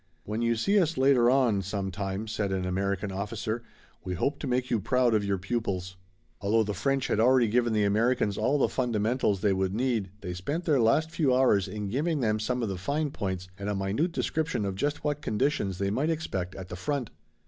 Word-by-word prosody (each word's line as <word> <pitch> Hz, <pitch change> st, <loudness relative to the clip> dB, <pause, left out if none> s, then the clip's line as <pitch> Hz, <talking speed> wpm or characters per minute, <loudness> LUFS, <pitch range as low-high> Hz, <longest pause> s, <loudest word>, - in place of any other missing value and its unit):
"When 105 Hz, +2 st, -3 dB
you 115 Hz, 0 st, +2 dB
see 200 Hz, -, +3 dB
us 170 Hz, -3 st, +1 dB
later 130 Hz, -3 st, +5 dB
on 125 Hz, -6 st, +3 dB
some 95 Hz, 0 st, -3 dB
time," 95 Hz, +2 st, -4 dB
said 105 Hz, -2 st, -2 dB
an 95 Hz, -1 st, -1 dB
American 100 Hz, +2 st, -1 dB
officer, 110 Hz, +4 st, -3 dB, 0.4 s
"we 90 Hz, -, -3 dB
hope 140 Hz, -, -1 dB
to 145 Hz, -, -4 dB
make 125 Hz, 0 st, -1 dB
you 115 Hz, -, +2 dB
proud 125 Hz, +3 st, +2 dB
of 105 Hz, -1 st, +2 dB
your 100 Hz, -1 st, 0 dB
pupils." 95 Hz, -3 st, -3 dB, 0.5 s
Although 110 Hz, +3 st, +3 dB
the 105 Hz, -1 st, -3 dB
French 135 Hz, +3 st, 0 dB
had -, -, 0 dB
already 125 Hz, +1 st, +5 dB
given 120 Hz, +2 st, +2 dB
the 105 Hz, -1 st, +2 dB
Americans 110 Hz, +1 st, +2 dB
all 130 Hz, +7 st, +1 dB
the 140 Hz, -, +3 dB
fundamentals 115 Hz, -4 st, 0 dB
they 100 Hz, -2 st, +3 dB
would 95 Hz, 0 st, -1 dB
need 115 Hz, -5 st, 0 dB
they 90 Hz, -, -4 dB
spent 145 Hz, -, -3 dB
their 150 Hz, -5 st, +3 dB
last 150 Hz, +8 st, +3 dB
few 145 Hz, -6 st, +2 dB
hours 105 Hz, -7 st, +3 dB
in 105 Hz, +1 st, -4 dB
giving 150 Hz, -, 0 dB
them 110 Hz, -3 st, +1 dB
some 125 Hz, +3 st, -1 dB
of 110 Hz, -, -1 dB
the 95 Hz, -2 st, -4 dB
fine 145 Hz, +7 st, -1 dB
points 95 Hz, -5 st, -4 dB
and 100 Hz, +1 st, -3 dB
a 105 Hz, -, -1 dB
minute 100 Hz, -, 0 dB
description 160 Hz, -8 st, -1 dB
of 100 Hz, -, -2 dB
just 145 Hz, +11 st, -2 dB
what 150 Hz, 0 st, -1 dB
conditions 105 Hz, -6 st, 0 dB
they 100 Hz, +1 st, -1 dB
might 135 Hz, +9 st, 0 dB
expect 100 Hz, -, -3 dB
at 95 Hz, -2 st, -8 dB
the -, -, -5 dB
front. 135 Hz, +4 st, -3 dB
110 Hz, 215 wpm, -28 LUFS, 100-130 Hz, 0.5 s, later